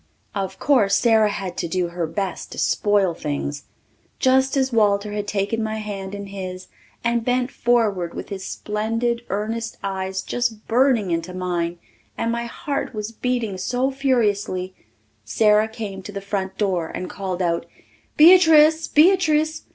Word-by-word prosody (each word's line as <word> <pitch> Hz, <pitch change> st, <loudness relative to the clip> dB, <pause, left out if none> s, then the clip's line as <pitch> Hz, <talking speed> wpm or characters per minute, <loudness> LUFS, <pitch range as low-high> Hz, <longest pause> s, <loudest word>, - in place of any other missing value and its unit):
Of 190 Hz, -1 st, -3 dB
course 205 Hz, -8 st, +3 dB
Sara 220 Hz, -3 st, +4 dB
had 190 Hz, -3 st, -5 dB
to -, -, -2 dB
do 175 Hz, +1 st, -1 dB
her 170 Hz, -1 st, -3 dB
best 190 Hz, +2 st, -4 dB
to -, -, -10 dB
spoil 205 Hz, -4 st, +2 dB
things. 145 Hz, -2 st, -4 dB, 0.5 s
Just 265 Hz, +1 st, +3 dB
as 265 Hz, -2 st, +1 dB
Walter 205 Hz, -2 st, +2 dB
had 205 Hz, 0 st, -3 dB
taken 205 Hz, +2 st, -1 dB
my 220 Hz, 0 st, -2 dB
hand 200 Hz, -2 st, -5 dB
in 200 Hz, 0 st, -6 dB
his 185 Hz, -2 st, -7 dB, 0.4 s
and 235 Hz, 0 st, +1 dB
bent 250 Hz, +1 st, 0 dB
forward 210 Hz, -8 st, +1 dB
with -, -, -6 dB
his 195 Hz, -2 st, -5 dB
splendid 230 Hz, +4 st, -2 dB
earnest 225 Hz, +3 st, -3 dB
eyes 190 Hz, -1 st, -3 dB
just 235 Hz, -3 st, -2 dB
burning 235 Hz, -5 st, +2 dB
into 165 Hz, +2 st, -2 dB
mine, 175 Hz, -2 st, -2 dB, 0.4 s
and 230 Hz, -, -1 dB
my 235 Hz, 0 st, -2 dB
heart 275 Hz, 0 st, -4 dB
was 210 Hz, +1 st, -4 dB
beating 230 Hz, -5 st, -2 dB
so 250 Hz, +7 st, 0 dB
furiously, 210 Hz, -9 st, 0 dB, 0.5 s
Sara 210 Hz, -, +3 dB
came 215 Hz, -4 st, -6 dB
to 195 Hz, -, -8 dB
the 200 Hz, -, -5 dB
front 195 Hz, -1 st, -4 dB
door 185 Hz, -6 st, 0 dB
and 180 Hz, -, -5 dB
called 185 Hz, -2 st, -4 dB
out, 170 Hz, -1 st, -1 dB, 0.5 s
"Beatrice! 320 Hz, -2 st, +7 dB
Beatrice! 315 Hz, -2 st, +3 dB
210 Hz, 150 wpm, -22 LUFS, 190-240 Hz, 0.5 s, Beatrice